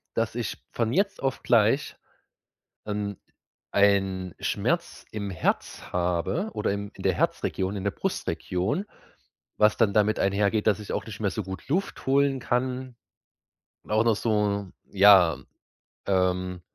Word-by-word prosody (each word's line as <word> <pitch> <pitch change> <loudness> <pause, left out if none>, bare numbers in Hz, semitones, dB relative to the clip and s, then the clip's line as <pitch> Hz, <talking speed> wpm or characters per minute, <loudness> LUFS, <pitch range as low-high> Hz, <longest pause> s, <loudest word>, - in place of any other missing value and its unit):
dass 115 0 -1
ich 120 -4 -3 0.2
von 115 -1 0
jetzt 195 - 0
auf 135 -1 -1
gleich 115 +4 +3 0.9
an 105 -1 -3 0.5
einen 95 -3 +2
Schmerz - - -1
im 100 -2 -4
Herz 90 -3 -1
habe 90 - 0
oder - - -1
im 100 0 -4
in - - -11
der - - +3
Herzregion, 95 +2 -1
in 95 - -5
der 100 - 0
Brustregion, 100 - -2 0.7
was 105 0 +4
dann 110 -4 +2
damit 105 +1 +2
einhergeht, 100 +2 +1
dass 110 - +3
ich 105 - -6
auch - - -2
nicht 110 -2 -8
mehr 100 -3 0
so - - -3
gut 95 0 -8
Luft 185 +8 -2
holen 135 0 +3
kann. 125 +1 -2 0.9
Auch 110 +2 +2
noch 115 -2 +4
so 105 -3 0 0.2
ja, 95 -4 +6 0.7
ähm 90 -1 0
105 Hz, 140 wpm, -26 LUFS, 95-115 Hz, 0.9 s, ja